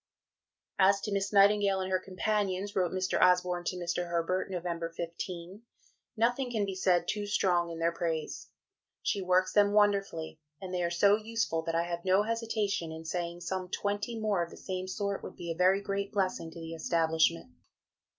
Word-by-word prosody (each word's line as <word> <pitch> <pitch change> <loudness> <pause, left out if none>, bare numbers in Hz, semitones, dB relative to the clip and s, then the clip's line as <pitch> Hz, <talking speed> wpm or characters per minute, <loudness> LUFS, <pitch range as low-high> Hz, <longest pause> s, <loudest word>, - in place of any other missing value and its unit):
"As 195 +1 +5
to 210 - -4
Miss 195 0 -1
Nightingale 200 -1 +5
and 185 0 -3
her 185 - +2
companions," 200 +1 -1
wrote 180 -3 +1
Mr. 185 0 0
Osborne 180 -1 +3
to 180 - -1
Mr. 175 0 -2
Herbert 175 +3 -1
(Nov. 180 -2 -4 0.3
15), 170 +3 -6 0.6
"nothing 245 +3 +1
can 220 -4 0
be 195 - -4
said 185 -2 +2
too 210 -1 -2
strong 175 -4 +2
in 165 - -6
their 165 +1 +1
praise; 165 -2 -3 0.5
she 200 - 0
works 185 0 +2
them 205 -1 +4
wonderfully, 195 -7 +1 0.2
and 185 -1 -7
they 180 - 0
are 170 - +1
so 200 +4 +4
useful 220 -6 -1
that 165 0 -3
I 165 - +2
have 170 0 -4
no 190 +2 +4
hesitation 215 -6 -1
in 160 0 -8
saying 170 +1 -3
some 185 0 -3
20 205 +4 -2
more 210 -4 +1
of 170 - -7
the - - -12
same 185 -1 -4
sort 200 +1 -2
would - - -8
be 170 -1 -5
a - - -3
very 185 +3 +4
great 200 0 -2
blessing 185 -5 -1
to 165 - -11
the 165 0 -6
establishment. 160 -2 +1
185 Hz, 185 wpm, -30 LUFS, 170-200 Hz, 0.6 s, As